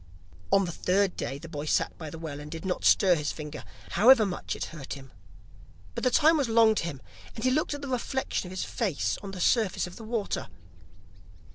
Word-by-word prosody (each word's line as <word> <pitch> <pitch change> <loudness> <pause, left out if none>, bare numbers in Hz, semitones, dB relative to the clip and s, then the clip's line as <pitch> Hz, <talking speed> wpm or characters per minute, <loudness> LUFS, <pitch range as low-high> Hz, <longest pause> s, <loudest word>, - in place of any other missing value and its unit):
On 195 0 +4
the 175 - -4
third 190 +3 +1
day, 135 +3 -4
the 165 - -10
boy 150 -2 -5
sat - - +1
by 160 -2 -6
the 165 - -8
well, 155 -3 -6
and 150 0 -8
did 165 +3 -7
not 180 -1 -2
stir 190 -3 +5
his 150 -3 -1
finger, 150 -1 -7 0.3
however 225 +3 +6
much 180 -3 -3
it - - -3
hurt 145 -5 -6
him. 135 -2 -11 0.8
But - - -5
the 255 - +4
time 315 +6 +5
was 275 -5 0
long 225 -1 +6
to 210 - -1
him, 145 -6 -6 0.3
and 220 - -6
he 255 - +3
looked 295 +1 0
at 290 - -8
the - - -4
reflection 260 -5 -2
of - - -9
his 185 - -3
face 200 - -1
on 200 - -7
the 195 -1 -7
surface 215 0 +2
of 180 - -10
the 225 - -9
water. 220 -2 -2
190 Hz, 225 wpm, -28 LUFS, 160-230 Hz, 0.8 s, however